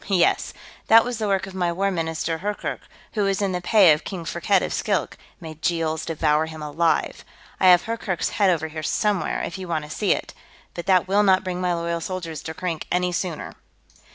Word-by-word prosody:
"Yes. 185 -4 +2 0.4
That 225 +1 +7
was 245 -2 -3
the 215 - -1
work 195 -1 +1
of 195 - -10
my 175 -2 0
War 195 +3 0
Minister, 160 -1 -2
Hurkkurk, 205 +3 -3 0.3
who 215 - -1
was 195 -1 +1
in 200 -2 0
the 180 -1 -2
pay 195 -2 +6
of 150 - -3
King 180 -4 -6
Firkked 180 +3 +1
of - - -3
Skilk, - - -1 0.2
may 160 -3 -8
Jeels 160 0 -1
devour 155 -1 +1
him 160 -1 -8
alive! 160 +3 0 0.4
I 190 - +4
have 180 -1 +7
Hurkkurk's 225 -6 -2
head 185 -6 +2
here 155 0 -5
somewhere, 205 +5 0
if 190 - -5
you 185 - -6
want 160 -3 -2
to 150 - -11
see 205 +5 0
it, - - -6 0.4
but 175 - -7
that 185 -1 +4
will 200 +2 +3
not 190 -2 +4
bring 180 -1 -3
my 180 -1 +1
loyal 170 0 -2
soldiers 170 -4 -5
to 160 - -7
Krink 170 -3 -4
any 180 0 +1
sooner." 175 -3 -4
180 Hz, 210 wpm, -23 LUFS, 165-195 Hz, 0.4 s, That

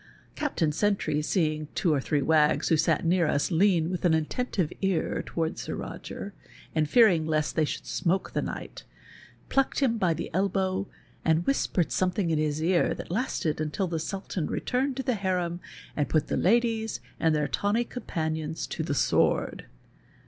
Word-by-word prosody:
Captain 220 - 0
Sentry, 195 -3 0
seeing 155 -2 0
two 170 -4 +2
or 140 - +1
three 145 +1 0
wags 155 -1 +3
who 160 - +5
sat 160 +2 +1
near 170 -1 +3
us 145 +6 0
lean 175 -1 +3
with 180 - -3
an 170 -3 +4
attentive 175 +2 -1
ear 190 -4 0
towards 160 -1 -3
Sir - - -4
Roger, 200 - -7 0.4
and 155 -2 +1
fearing 180 -7 +5
lest 155 -1 0
they 160 - +3
should - - -4
snioak 185 +1 -1
the - - -1
knight, - - -6 0.6
plucked 270 0 +1
him 240 -5 +1
by 175 -4 +2
the 160 - -5
elbow, 190 +1 0 0.4
and 160 +1 +2
whispered 190 - +1
something 180 -1 0
in 155 - +1
his 155 0 -1
ear 175 +1 +2
that - - -8
lasted 175 - -1
until 155 +5 -1
the 165 -2 -2
Sultan 185 -1 -3
returned 260 +1 -1
to 265 - -2
the 255 - +1
harem 180 -4 -1 0.4
and 145 -2 0
i)ut 155 -2 +2
the - - 0
ladies 225 +1 +1 0.2
and 160 -1 +3
their 150 -1 +1
tawny 205 +10 +1
companions 160 -9 -3
to - - -4
the - - -2
sword. - - +1
170 Hz, 170 wpm, -27 LUFS, 155-200 Hz, 0.6 s, who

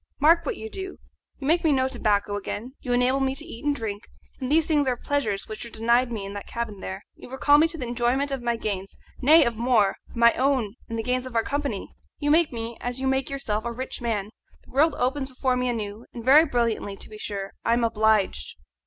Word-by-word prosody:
Mark 325 +2 +5
what - - -2
you 220 - -6
do: 380 - -6 0.4
you 270 - -7
make 330 +4 +3
me 320 - +4
know 260 -2 +2
tobacco 210 -5 0
again, 215 +5 -5
you 250 - -4
enable 250 +2 +3
me 270 0 0
to 300 - -5
eat 255 -7 -9
and 290 -1 +1
drink, 215 -4 -5 0.3
and 260 0 -3
these 320 +1 +4
things 295 -4 +2
are 250 -1 +1
pleasures 225 -9 -1
which 215 0 -6
were 235 - -7
denied 235 +3 +2
me 210 -4 -4
in 200 - -6
that 205 - -7
cabin 230 -4 -4
there. 190 +1 -6
You - - -12
recall 290 +3 +4
me 320 - +5
to 330 0 -3
the 260 - -4
enjoyment 245 +4 0
of 270 -2 -2
my 235 0 0
gains, 200 -4 -4 0.2
nay, 305 +3 +7
of 235 -2 -1
more 230 -4 +3
of - - -16
my 235 0 +6
own 255 -6 +1 0.2
and 230 - -3
the 225 - -2
gains 255 +1 -1
of 250 - -10
our 225 - +3
company. 280 -7 -3 0.2
You 290 -1 0
make 325 0 +4
me, 230 -1 -5
as 245 +1 -3
you 265 - -2
make 265 0 +1
yourself, 220 -6 -2
a 235 - -3
rich 255 +2 -5
man; 215 -3 -2 0.3
the - - -17
world 295 +4 +3
opens 265 +2 -1
before 255 0 0
me 250 0 0
anew, 215 -1 -4
and 235 -1 -7
very 295 +5 +8
brilliantly 230 -7 -1
to - - -10
be 215 -1 -11
sure, 200 -2 -4
I 230 - +2
am 235 0 +2
obliged." 220 - +1
245 Hz, 240 wpm, -25 LUFS, 220-275 Hz, 0.4 s, very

